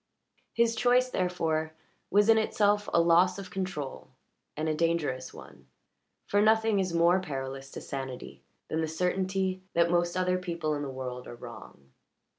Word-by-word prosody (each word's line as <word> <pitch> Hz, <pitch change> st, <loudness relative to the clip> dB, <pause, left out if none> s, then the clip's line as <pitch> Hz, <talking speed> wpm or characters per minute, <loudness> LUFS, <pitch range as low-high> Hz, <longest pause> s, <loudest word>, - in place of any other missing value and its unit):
His 230 Hz, 0 st, +2 dB
choice, 250 Hz, +2 st, +3 dB
therefore, 160 Hz, -3 st, -1 dB, 0.4 s
was 205 Hz, +2 st, +4 dB
in 225 Hz, -1 st, +6 dB
itself 205 Hz, -1 st, +1 dB
a -, -, +4 dB
loss 175 Hz, +2 st, +4 dB
of 195 Hz, -1 st, -8 dB
control 185 Hz, -8 st, -4 dB, 0.5 s
and 155 Hz, +1 st, -1 dB
a 155 Hz, -, +1 dB
dangerous 155 Hz, -6 st, -1 dB
one, -, -, -14 dB, 0.6 s
for 205 Hz, -, +2 dB
nothing 220 Hz, -1 st, +3 dB
is 185 Hz, -2 st, 0 dB
more 170 Hz, +2 st, +4 dB
perilous 135 Hz, -5 st, -5 dB
to -, -, -8 dB
sanity 130 Hz, -2 st, -7 dB, 0.3 s
than 160 Hz, -, -1 dB
the 160 Hz, -, -1 dB
certainty 185 Hz, +3 st, -1 dB
that 170 Hz, 0 st, +3 dB
most 175 Hz, 0 st, +1 dB
other 185 Hz, 0 st, +1 dB
people 170 Hz, -4 st, -2 dB
in 145 Hz, -, -3 dB
the 140 Hz, -, -4 dB
world 125 Hz, -1 st, -6 dB
are -, -, -8 dB
wrong. 70 Hz, -, -12 dB
175 Hz, 160 wpm, -29 LUFS, 155-195 Hz, 0.6 s, in